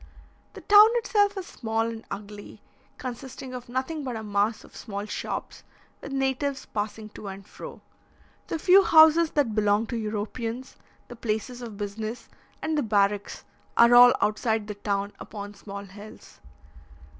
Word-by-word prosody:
The - - -10
town 415 +1 +8
itself 415 -4 +2
is 380 - -4
small 225 -6 -2
and 230 0 -5
ugly, 205 +1 -8 0.4
consisting 255 +1 -7
of 250 -1 -8
nothing 265 +5 -3
but 255 -3 -4
a 220 - -5
mass 205 +2 0
of - - -17
small 200 -2 -6
shops, 210 - -5 0.4
with 280 - -8
natives 270 0 -1
passing 215 +1 -4
to 210 - -10
and 195 0 -8
fro. - - -10 0.7
The - - -2
few 375 +4 +6
houses 320 0 +6
that 275 -7 +1
belong 210 +1 +2
to 235 - -5
Europeans, 225 +3 -4 0.3
the 240 - -10
places 230 +2 -3
of 225 -4 -8
business, 215 +3 -5 0.3
and 315 - 0
the 295 - +2
barracks, 205 -3 0 0.3
are 235 +1 +7
all 245 0 +9
outside 220 0 0
the 210 - -5
town, 200 0 -2
upon 205 -1 -8
small 200 0 -8
hills. 205 +2 -13
225 Hz, 155 wpm, -26 LUFS, 205-265 Hz, 0.7 s, all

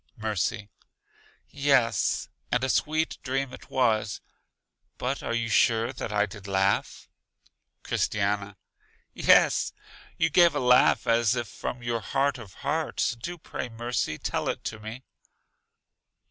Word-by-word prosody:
Mercy: 105 -2 -2 0.8
Yes, 135 -5 +1 0.2
and 125 +1 +1
a 130 - 0
sweet 155 +3 0
dream 135 0 -2
it - - -12
was. 110 -5 +1 0.8
But 130 +3 -2
are 115 - -2
you 115 -1 -1
sure 115 +2 +2
that 115 - -5
I 105 0 +2
did 100 -1 -11
laugh? 95 0 0 0.8
Christiana: 100 -1 -1 0.6
Yes, - - +4 0.4
you 165 - +2
gave 170 0 +5
a - - +1
laugh 125 0 +4
as 115 0 +3
if 120 -2 -2
from 125 +4 -6
your 120 -1 -1
heart 135 +4 0
of 110 -5 -11
hearts. 150 -3 0
Do 170 +10 -6
pray, 130 - -6
Mercy, 115 -8 -2
tell - - -2
it - - -3
to 115 - -5
me. 110 +4 -8
120 Hz, 135 wpm, -27 LUFS, 105-135 Hz, 0.8 s, gave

